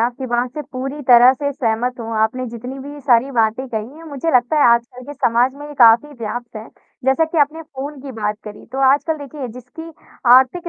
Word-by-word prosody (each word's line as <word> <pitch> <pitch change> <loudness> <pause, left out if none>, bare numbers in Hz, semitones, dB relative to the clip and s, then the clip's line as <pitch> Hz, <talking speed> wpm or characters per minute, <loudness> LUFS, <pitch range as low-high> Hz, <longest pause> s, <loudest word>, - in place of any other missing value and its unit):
आपकी 245 +3 -2
बात 240 +1 -1
से 300 - -4
पूरी 270 +3 -5
तरह 245 +1 +8
से 285 +1 -3
सहमत 245 -1 -2
हूँ, 230 0 -6
आपने 235 +4 0
जितनी 245 +3 -8
भी 290 +2 -9
सारी 260 -1 +2
बातें 230 +1 0
कही 230 +5 -5
हैं, 330 - -13
मुझे 285 +4 -2
लगता 250 +5 0
है 295 - +5
आजकल 235 +2 -5
के 290 - -7
समाज 250 -1 +1
में 290 +1 -10
ये 295 - -10
काफ़ी 235 +3 +6
व्याप्त 235 +1 -6
है 215 +1 -9 0.4
जैसा 265 +5 +3
कि 320 +1 -3
आपने 300 +3 +1
फ़ोन 280 -1 -8
की 270 0 -8
बात 210 0 -1
करी, 210 -1 -10
तो 265 - -4
आजकल 305 +3 +1
देखिए 285 -1 -7
जिसकी 255 +7 -10 0.4
आर्थिक 265 +7 +3
255 Hz, 215 wpm, -19 LUFS, 235-285 Hz, 0.4 s, तरह